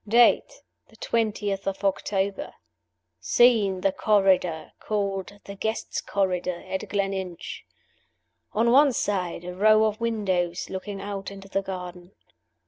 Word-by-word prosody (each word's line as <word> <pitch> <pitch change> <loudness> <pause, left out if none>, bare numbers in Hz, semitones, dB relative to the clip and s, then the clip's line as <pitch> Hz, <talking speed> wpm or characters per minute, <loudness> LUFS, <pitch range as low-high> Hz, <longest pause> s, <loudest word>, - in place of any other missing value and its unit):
Date, 240 - +4 0.2
the - - -21
twentieth 205 -4 -1
of 195 +1 -3
October. 195 0 -1 0.6
Scene 205 - +4
the 195 - +2
Corridor, 190 -6 +2
called 200 -1 -3
the 200 - -7
Guests' 220 +3 -3
Corridor, 180 -3 -1
at 190 +2 -4
Gleninch. 195 -3 -3 0.9
On 230 +2 +3
one 280 +1 +6
side, 185 -6 -2
a 180 - -5
row 215 +3 +5
of 215 +1 -2
windows 190 -7 -1
looking 195 +1 -5
out 195 0 -5
into 195 0 -11
the 195 - 0
garden. 180 -1 -7
195 Hz, 125 wpm, -25 LUFS, 185-215 Hz, 0.9 s, one